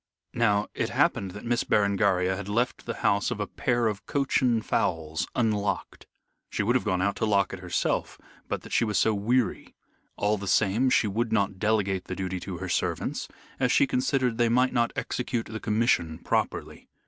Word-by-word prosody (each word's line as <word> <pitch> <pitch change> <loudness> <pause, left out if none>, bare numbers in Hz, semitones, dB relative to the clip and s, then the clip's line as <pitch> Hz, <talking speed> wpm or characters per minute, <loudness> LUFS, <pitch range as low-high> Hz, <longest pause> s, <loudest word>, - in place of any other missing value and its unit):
Now 105 -3 +2
it - - -1
happened 95 - +1
that 105 +5 -9
Miss 120 +1 +1
Berengaria 100 -2 +2
had 100 +1 -6
left 120 +4 -1
the - - -3
house - - +3
of - - -4
a - - 0
pair 120 -1 0
of 105 -3 -1
Cochin 130 -5 +1
fowls 80 -5 -1
unlocked. 105 -4 -1 0.4
She - - -1
would 115 +4 +2
have 130 - +2
gone 90 -4 0
out 100 0 +1
to 110 - 0
lock 100 -2 +2
it 95 - -6
herself 90 -1 -1 0.3
but - - -3
that - - -9
she - - +3
was 105 -4 0
so 110 - +3
weary. 115 +4 0 0.4
All 105 0 +1
the 100 - -6
same, 110 +7 +3
she 120 - +3
would 110 +3 -1
not 100 -3 0
delegate 100 -3 +1
the - - -5
duty 95 -1 -3
to 90 0 -6
her 95 +2 -5
servants, - - -1 0.3
as 125 -2 +2
she - - +5
considered 125 -2 0
they 120 -1 +4
might 125 +2 +3
not 120 -1 +2
execute 120 -2 -2
the 110 0 -6
commission 105 -8 +1
properly. - - -2
105 Hz, 190 wpm, -27 LUFS, 95-120 Hz, 0.4 s, she